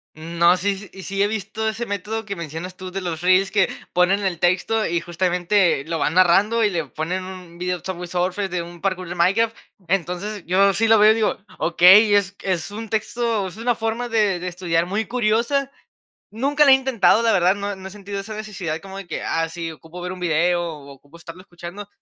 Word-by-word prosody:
Mm, 165 +2 -8
no. 175 +2 +6
Sí, 200 0 -2
y 190 - -11
sí, 195 +1 -2
he 205 - +4
visto 220 +1 -3
ese 230 +2 -4
método 210 +2 -4
que 200 -1 -5
mencionas 170 +2 -7
tú 185 -1 -8
de 195 +1 -4
los 170 -3 -4
reels 185 +2 +3
que, 200 -3 +2 0.2
ponen 185 +3 +3
el 180 -4 -1
texto 190 +5 +1
y, 170 0 0
justamente, 175 -1 +1
lo 165 -1 -3
van 150 +3 0
narrando 200 +6 +4
y 210 - +3
le 165 -5 -2
ponen 165 +8 -4
un 180 -2 -10
video 180 0 -1
de 175 - -20
Subway 180 -2 -5
Surfers, 185 +3 -1
de 175 -1 -2
un 170 0 -10
parcour 185 -2 -2
de 175 - -6
Minecraft. 205 +6 +2 0.3
Entonces, 190 +2 -2
yo 195 +3 +3
sí 225 +3 +2
lo 225 0 +6
veo 215 +1 +7
y - - +2
digo: 220 -1 0 0.2
"Okey, 190 +5 +6
es 200 0 +1
es 185 0 -2
un 220 +1 -7
texto, 220 -1 -1
es 185 - -8
una 240 +1 0
forma 230 +2 -3
de 210 -5 +1
de 180 - -5
estudiar 175 -2 -1
muy 210 +3 -1
curiosa". 245 +4 0 0.6
Nunca 280 +7 +2
la 275 - +7
he - - +10
intentado, 260 -4 +3
la 225 - +3
verdad, 185 +1 +3
no 200 0 -4
no 190 0 -9
he - - -10
sentido 200 0 -6
esa 215 +2 -7
necesidad 195 -7 -5
como 195 0 -9
de 195 -3 -8
que: 160 - -4
"Ah, 165 0 0
sí, 165 0 -5
ocupo 160 +3 -11
ver 180 +1 -4
un 185 - -8
video, 175 +1 +1
o 150 -5 -7
ocupo 140 +3 -17
estarlo 170 +1 -11
escuchando", 180 +2 -9
190 Hz, 225 wpm, -22 LUFS, 175-215 Hz, 0.6 s, he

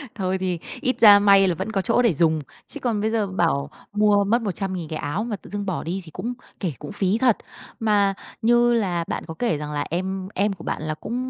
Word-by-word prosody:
Thôi 190 -2 -1
thì 180 -2 -2 0.2
ít 255 -1 +1
ra 205 -3 +9
may 195 -1 +6
là 175 - +1
vẫn 220 - -4
có 195 -3 0
chỗ 245 - +2
để 230 -8 +3
dùng. 160 0 +2 0.3
Chứ 290 - -7
còn 225 -5 -1
bây 220 - +1
giờ 215 -3 0
bảo 165 -6 0 0.2
mua 210 -1 +4
mất 230 +4 +2
100.000 190 -4 -3
cái 155 - -4
áo 150 +9 -2
mà 230 -3 -3
tự - - -14
dưng 205 0 -4
bỏ 185 -3 -2
đi 185 +4 -3
thì 160 - -12
cũng, 230 +9 -4 0.3
kể 175 -7 -2
cũng - - -7
phí 200 +1 +1
thật. 245 -3 +3 0.4
Mà 205 -3 +2 0.3
như 240 +1 +4
là 180 -7 0
bạn - - -3
có 160 - -5
kể 230 -11 +1
rằng 150 0 -5
là 145 -1 -2
em 185 +2 -3
em 200 +1 +1
của 170 - -12
bạn - - -3
là 155 0 -2
cũng 230 +9 -6
195 Hz, 245 wpm, -23 LUFS, 175-215 Hz, 0.4 s, ra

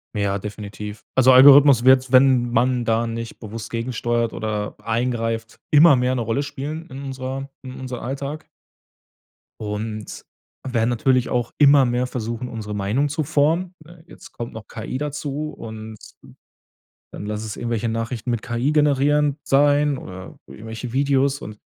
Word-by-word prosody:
Ja, 100 -1 0
definitiv. 105 0 -8
Also, 130 0 +6
Algorithmus 135 -1 +8
wird, 130 0 +5
wenn 130 -2 +4
man 120 +1 +1
da 115 +1 +1
nicht 115 0 -6
bewusst 110 0 -8
gegensteuert 115 0 -1
oder 105 -1 -4
eingreift, 115 0 -2
immer 150 0 +7
mehr 125 0 +1
'ne 125 - -1
Rolle 115 +5 -1
spielen 150 +3 -6
in 135 +1 -7
unserer 135 +1 -5
in 130 -1 -9
unserem 130 -2 -6
Alltag. 140 +4 -5 1.2
Und 105 0 -5 0.4
werden 120 -3 0
natürlich 125 +1 +1
auch 120 -1 -1
immer 140 -1 +6
mehr 125 +1 0
versuchen, 120 0 -4
unsere 105 -3 -6
Meinung 105 +9 0
zu 150 +2 -2
formen. 165 +5 +1
Äh, 170 0 -16
jetzt - - -14
kommt 120 0 -7
noch 110 -1 -9
KI 115 +3 -5
dazu 150 +1 -4
und 110 -3 -9 1.1
dann 105 - -8
lasse 105 +1 -4
es 105 - -6
irgendwelche 115 -1 -2
Nachrichten 115 +1 -3
mit 120 -2 -1
KI 125 +4 -1
generierend 145 0 +2
sein 145 0 +3
oder 95 0 -10
irgendwelche 115 +2 -8
Videos. 140 +1 +1
Und 105 -5 -9
125 Hz, 150 wpm, -22 LUFS, 115-140 Hz, 1.2 s, Algorithmus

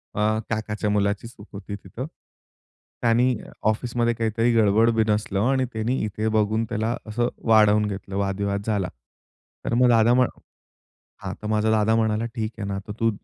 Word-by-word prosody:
अ, 110 +1 +1
काकाच्या 105 -1 -2
मुलाची 105 +2 0
चूक 110 -3 -14
होती 100 0 -6
तिथं. 100 +6 -7 1.0
त्यानी 120 +2 +3 0.3
ऑफिसमध्ये 120 +1 0
काहीतरी 115 +1 +1
गडबड, 110 +1 +4
बीनसलं 105 -3 +1
आणि 130 -1 +1
त्यांनी 115 +4 -1
इथे 105 +1 -2
बघून 110 +1 +1
त्याला 110 +1 -1
असं 120 +3 0 0.2
वाढवून 105 -1 +5
घेतलं, 95 -1 -6
वादविवाद 100 0 -1
झाला. 105 -4 0 0.8
तर - - -1
मग 125 +1 +4
दादा 115 0 +5
म्ह 125 0 +5 1.0
हां. - - -4
तर 105 - -5
माझा 110 0 +1
दादा 110 0 +3
म्हणाला, 110 0 +1
"ठीक 115 -2 -4
आहे 100 - -3
ना, 100 -1 -3
तर 105 - -5
तू 115 - +3
110 Hz, 160 wpm, -24 LUFS, 105-115 Hz, 1.0 s, वाढवून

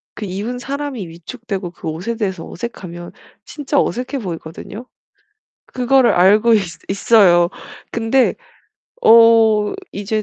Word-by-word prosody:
그 215 - -6
입은 205 +6 -5
사람이 270 -6 -5
위축되고 190 +2 -7
그 165 - -10
옷에 175 +9 -4
대해서 190 -6 -4
어색하면 175 -7 -8 0.3
진짜 285 -1 -2
어색해 255 +3 -3
보이거든요. 175 +6 -8 0.8
그거를 255 0 +2
알고 210 +6 +4
있 215 - +4 0.3
있어요. 195 -4 +4 0.4
근데 235 +3 +1 0.7
어 225 -2 +5 0.2
이제 210 +2 -3
215 Hz, 260 characters per minute, -18 LUFS, 185-240 Hz, 0.8 s, 어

